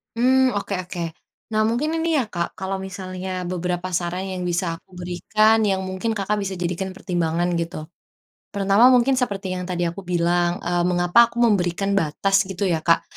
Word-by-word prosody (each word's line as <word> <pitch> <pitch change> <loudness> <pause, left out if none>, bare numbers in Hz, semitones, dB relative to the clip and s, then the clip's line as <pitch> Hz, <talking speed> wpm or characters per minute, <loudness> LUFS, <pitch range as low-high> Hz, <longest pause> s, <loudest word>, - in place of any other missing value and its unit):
Mmm, 255 +1 +3
oke 200 0 -3
oke. 180 -1 -6 0.5
Nah 215 0 +2
mungkin 240 +7 0
ini 330 0 +1
ya 255 - +1
Kak, 170 -1 -3
kalau 190 0 -2
misalnya 185 -1 -5
beberapa 180 0 -2
saran 175 +2 -2
yang 185 -1 -4
bisa 175 -1 -1
aku - - -34
berikan, 215 +5 +2
yang 190 -1 +1
mungkin 190 +4 -2
Kakak 210 +1 -1
bisa 195 -1 -3
jadikan 180 +2 -2
pertimbangan, 175 -2 -1
gitu. 165 -2 -5 0.7
Pertama, 200 +4 +4
mungkin 255 +2 +3
seperti 200 -6 -2
yang 180 0 -3
tadi 180 -1 -2
aku 175 +2 -3
bilang, 175 0 +1
eee, 175 0 0
mengapa 175 +6 +4
aku 235 +1 -2
memberikan 195 -3 +2
batas 195 +5 +1
gitu 190 +1 -6
ya 175 -4 +2
Kak, 165 +1 +2
185 Hz, 175 wpm, -22 LUFS, 175-205 Hz, 0.7 s, Pertama